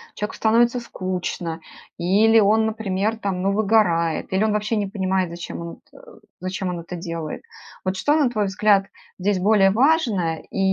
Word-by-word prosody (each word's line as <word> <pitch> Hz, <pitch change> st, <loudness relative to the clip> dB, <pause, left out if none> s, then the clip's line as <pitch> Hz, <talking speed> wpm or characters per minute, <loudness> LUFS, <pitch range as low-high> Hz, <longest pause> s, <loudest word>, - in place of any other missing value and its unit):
человеку 210 Hz, -, -4 dB
становится 235 Hz, +2 st, +3 dB
скучно, 180 Hz, -6 st, -4 dB, 0.4 s
или 210 Hz, +6 st, +4 dB
он, 220 Hz, +1 st, +3 dB
например, 215 Hz, 0 st, -1 dB
там, 195 Hz, -4 st, -3 dB
ну, 195 Hz, +1 st, +1 dB
выгорает, 195 Hz, -7 st, +1 dB
или 190 Hz, -, +1 dB
он 215 Hz, -, +1 dB
вообще 210 Hz, +2 st, -1 dB
не 205 Hz, -1 st, -1 dB
понимает, 190 Hz, -2 st, -1 dB
зачем 170 Hz, 0 st, -7 dB
он 170 Hz, 0 st, -6 dB, 0.2 s
эт -, -, -16 dB, 0.4 s
зачем 185 Hz, 0 st, -3 dB
он 175 Hz, -1 st, -4 dB
это 170 Hz, +2 st, -7 dB
делает? 165 Hz, -2 st, -5 dB, 0.4 s
Вот 185 Hz, 0 st, -2 dB
что, 295 Hz, +8 st, +2 dB
на 290 Hz, -5 st, +3 dB
твой 215 Hz, -4 st, -1 dB
взгляд, 200 Hz, 0 st, +2 dB, 0.3 s
здесь 195 Hz, +1 st, 0 dB
более 195 Hz, 0 st, +4 dB
важное 220 Hz, -, +1 dB
и -, -, -5 dB
195 Hz, 170 wpm, -22 LUFS, 180-220 Hz, 0.4 s, или